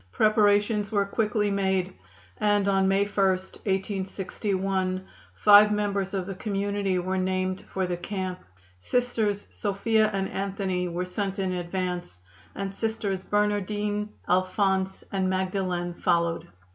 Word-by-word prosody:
Preparations 210 Hz, -, +3 dB
were 200 Hz, -2 st, +2 dB
quickly 210 Hz, 0 st, 0 dB
made, 190 Hz, -2 st, 0 dB, 0.5 s
and 205 Hz, -1 st, +2 dB
on 195 Hz, -1 st, +3 dB
May 195 Hz, +1 st, +3 dB
1, 205 Hz, -, -11 dB
1861, 190 Hz, 0 st, -2 dB, 0.3 s
five 210 Hz, 0 st, +7 dB
members 200 Hz, -2 st, -1 dB
of 190 Hz, -2 st, -1 dB
the 195 Hz, -, -5 dB
community 200 Hz, -1 st, -1 dB
were 185 Hz, +1 st, -1 dB
named 185 Hz, 0 st, -1 dB
for 190 Hz, -1 st, -1 dB
the 180 Hz, -1 st, -2 dB
camp. 185 Hz, 0 st, -4 dB, 0.4 s
Sisters 220 Hz, -, 0 dB
Sophia 215 Hz, +2 st, +1 dB
and 195 Hz, -1 st, -1 dB
Anthony 190 Hz, -2 st, -2 dB
were 175 Hz, +1 st, -2 dB
sent 195 Hz, +2 st, -3 dB
in 190 Hz, -2 st, -1 dB
advance, 180 Hz, -, -3 dB, 0.4 s
and 195 Hz, -1 st, -4 dB
Sisters 205 Hz, -3 st, -2 dB
Bernardine, 210 Hz, 0 st, 0 dB, 0.2 s
Alphonse 190 Hz, +1 st, +1 dB
and 190 Hz, -1 st, 0 dB
Magdalen 185 Hz, -2 st, -1 dB
followed. 170 Hz, -1 st, 0 dB
195 Hz, 120 wpm, -26 LUFS, 185-205 Hz, 0.5 s, five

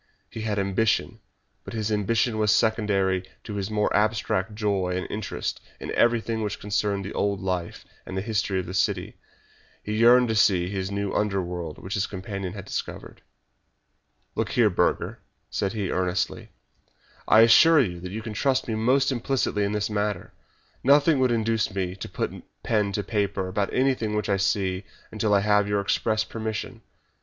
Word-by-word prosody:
He 115 Hz, -, -6 dB
had 110 Hz, -1 st, -2 dB
ambition, 100 Hz, +2 st, 0 dB, 0.4 s
but -, -, -8 dB
his 110 Hz, -1 st, -2 dB
ambition 110 Hz, +2 st, +1 dB
was 105 Hz, -1 st, +3 dB
secondary 100 Hz, -5 st, +2 dB, 0.2 s
to 105 Hz, -, -7 dB
his 100 Hz, 0 st, -3 dB
mere 105 Hz, -1 st, +1 dB
abstract 105 Hz, -1 st, 0 dB
joy 100 Hz, -4 st, 0 dB
and 90 Hz, -, -3 dB
interest 105 Hz, 0 st, -4 dB, 0.2 s
in -, -, -6 dB
everything 115 Hz, -1 st, +2 dB
which 105 Hz, -1 st, -3 dB
concerned 100 Hz, -1 st, -1 dB
the 100 Hz, -, -6 dB
old 100 Hz, -1 st, 0 dB
life 90 Hz, -2 st, -3 dB, 0.2 s
and 95 Hz, -, -6 dB
history 100 Hz, -1 st, -1 dB
of 90 Hz, -, -4 dB
the 90 Hz, -, -7 dB
city. 95 Hz, -, -1 dB, 0.7 s
He 105 Hz, -, -4 dB
yearned 120 Hz, +2 st, +6 dB
to -, -, +1 dB
see 95 Hz, -4 st, +3 dB
this 95 Hz, -1 st, -2 dB
new 100 Hz, 0 st, -2 dB
underworld 90 Hz, -6 st, -2 dB
which 95 Hz, -, -7 dB
his 100 Hz, -1 st, 0 dB
companion 95 Hz, -1 st, -5 dB
had -, -, -8 dB
discovered. -, -, -6 dB, 1.1 s
"Look -, -, -1 dB
here, -, -, +4 dB
Burger," -, -, 0 dB, 0.3 s
said 95 Hz, -, -1 dB
he, 100 Hz, -4 st, -2 dB
earnestly, 90 Hz, 0 st, -1 dB, 0.8 s
"I 110 Hz, -, +7 dB
assure 155 Hz, +8 st, +7 dB
you 90 Hz, -10 st, 0 dB
that 90 Hz, +1 st, -7 dB
you 110 Hz, +2 st, -5 dB
can 110 Hz, -1 st, -5 dB
trust 135 Hz, +4 st, +1 dB
me 115 Hz, -, -2 dB
most 130 Hz, +5 st, +2 dB
implicitly 125 Hz, -4 st, 0 dB
in 100 Hz, -, 0 dB
the 105 Hz, -1 st, 0 dB
matter. 105 Hz, -3 st, -2 dB, 0.5 s
Nothing 145 Hz, +2 st, +5 dB
would 130 Hz, -1 st, +3 dB
induce 110 Hz, -3 st, 0 dB
me 90 Hz, -2 st, -2 dB
to -, -, -7 dB
put -, -, -4 dB, 0.2 s
pen 105 Hz, -3 st, +1 dB
to 105 Hz, -, -1 dB
paper 100 Hz, -2 st, -1 dB
about 100 Hz, +2 st, -1 dB
anything 125 Hz, -5 st, +1 dB
which 105 Hz, -, -1 dB
I 100 Hz, -, +2 dB
see 95 Hz, -1 st, 0 dB, 0.3 s
until 110 Hz, -1 st, -1 dB
I 100 Hz, -1 st, +4 dB
have 105 Hz, 0 st, +3 dB
your 105 Hz, 0 st, +1 dB
express 110 Hz, +2 st, +1 dB
permission. 110 Hz, -1 st, -5 dB
105 Hz, 170 wpm, -25 LUFS, 95-110 Hz, 1.1 s, I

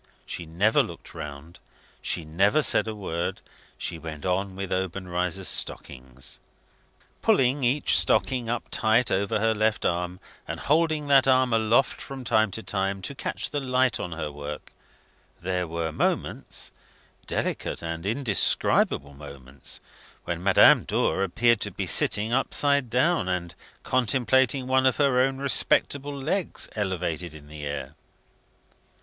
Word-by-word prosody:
She 85 Hz, -, -7 dB
never 100 Hz, +7 st, +3 dB
looked -, -, -8 dB
round; 75 Hz, +2 st, -9 dB, 0.4 s
she 80 Hz, -, -3 dB
never 100 Hz, -, +2 dB
said -, -, +3 dB
a 110 Hz, -, -4 dB
word; 85 Hz, -4 st, -3 dB, 0.4 s
she 85 Hz, -, -4 dB
went 80 Hz, -1 st, -8 dB
on 95 Hz, +1 st, -1 dB
with 95 Hz, -1 st, -5 dB
Obenreizer's 90 Hz, 0 st, -2 dB
stockings. 65 Hz, +1 st, -3 dB, 0.8 s
Pulling 135 Hz, +1 st, +2 dB
each 130 Hz, +5 st, +2 dB
stocking 125 Hz, -4 st, +2 dB
up 120 Hz, 0 st, -1 dB
tight 115 Hz, +3 st, +2 dB
over 100 Hz, +2 st, 0 dB
her 110 Hz, +1 st, +2 dB
left 110 Hz, 0 st, 0 dB
arm, 90 Hz, +1 st, -1 dB, 0.3 s
and -, -, -5 dB
holding 155 Hz, 0 st, +1 dB
that 135 Hz, -2 st, +4 dB
arm 130 Hz, -2 st, +3 dB
aloft 115 Hz, +4 st, +2 dB
from 135 Hz, -1 st, -8 dB
time 110 Hz, -2 st, +2 dB
to 110 Hz, +4 st, -7 dB
time, 95 Hz, -1 st, -2 dB
to 140 Hz, -, -3 dB
catch 135 Hz, -, -3 dB
the 145 Hz, -, -1 dB
light 130 Hz, -1 st, +1 dB
on 90 Hz, -4 st, -4 dB
her 80 Hz, -2 st, -4 dB
work, 75 Hz, +1 st, -8 dB, 0.7 s
there 90 Hz, 0 st, -2 dB
were 80 Hz, 0 st, -3 dB
moments -, -, -1 dB, 0.6 s
delicate -, -, -3 dB
and 85 Hz, 0 st, -4 dB
indescribable 105 Hz, -, +2 dB
moments 70 Hz, -2 st, -9 dB, 0.4 s
when 85 Hz, 0 st, -4 dB
Madame 95 Hz, 0 st, +6 dB
Dor 95 Hz, -, 0 dB
appeared 115 Hz, +4 st, +2 dB
to -, -, -2 dB
be -, -, -4 dB
sitting 110 Hz, +3 st, +2 dB
upside 140 Hz, 0 st, +2 dB
down, 130 Hz, -, +2 dB
and 90 Hz, -2 st, -2 dB, 0.3 s
contemplating 130 Hz, +2 st, +2 dB
one 130 Hz, 0 st, +3 dB
of 130 Hz, -, +1 dB
her 135 Hz, -3 st, +3 dB
own 135 Hz, +1 st, +1 dB
respectable 140 Hz, +1 st, +1 dB
legs, 165 Hz, +7 st, -1 dB
elevated 90 Hz, -5 st, -3 dB
in 75 Hz, -1 st, -13 dB
the 75 Hz, -1 st, -7 dB
air. 70 Hz, -1 st, -5 dB
100 Hz, 140 wpm, -26 LUFS, 85-130 Hz, 0.8 s, Madame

